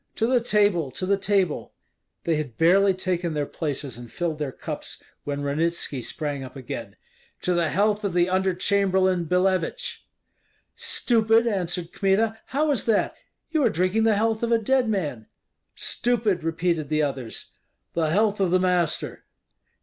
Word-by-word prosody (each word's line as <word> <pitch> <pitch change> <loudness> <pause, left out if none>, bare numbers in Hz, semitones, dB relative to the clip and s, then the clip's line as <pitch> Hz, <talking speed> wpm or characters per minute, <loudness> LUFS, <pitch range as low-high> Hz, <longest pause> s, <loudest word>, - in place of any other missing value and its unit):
"To 225 - +1
the 245 0 +3
table! 205 - +2
to 135 +8 -4
the 200 +2 +3
table!" 195 -4 0 0.5
They 165 - +1
had 140 -7 -5
barely 190 +4 +4
taken 180 -3 -1
their 145 -1 0
places 140 -6 -4
and 120 -2 -10
filled 165 -3 -2
their 145 -3 -2
cups - - -7 0.2
when 145 0 -3
Ranitski 150 -1 -1
sprang 145 -1 -4
up 130 - -10
again: 120 -6 -7 0.5
"To 180 - +1
the 170 -2 +1
health 210 +4 +1
of 200 -3 -1
the 175 0 +4
Under 185 0 +1
chamberlain 190 -2 +2
Billevich!" 185 - 0 0.7
"Stupid!" 225 -1 +2
answered 180 -5 -2
Kmita, 215 +3 +1
"how 295 +3 +1
is 260 -8 0
that? 225 -3 +1 0.4
You 315 -3 +2
are - - +4
drinking 185 +6 +1
the 220 -2 +4
health 220 +1 +1
of 235 0 0
a 230 - +5
dead 245 +2 +1
man." 145 - -2 0.5
"Stupid!" 220 -8 0
repeated 165 -2 -1
the 155 0 +2
others. 135 -5 -4 0.4
"The 160 -2 +1
health 205 +4 +2
of 190 -2 +2
the 185 +1 +3
master!" 180 -3 0
185 Hz, 160 wpm, -25 LUFS, 155-210 Hz, 0.7 s, a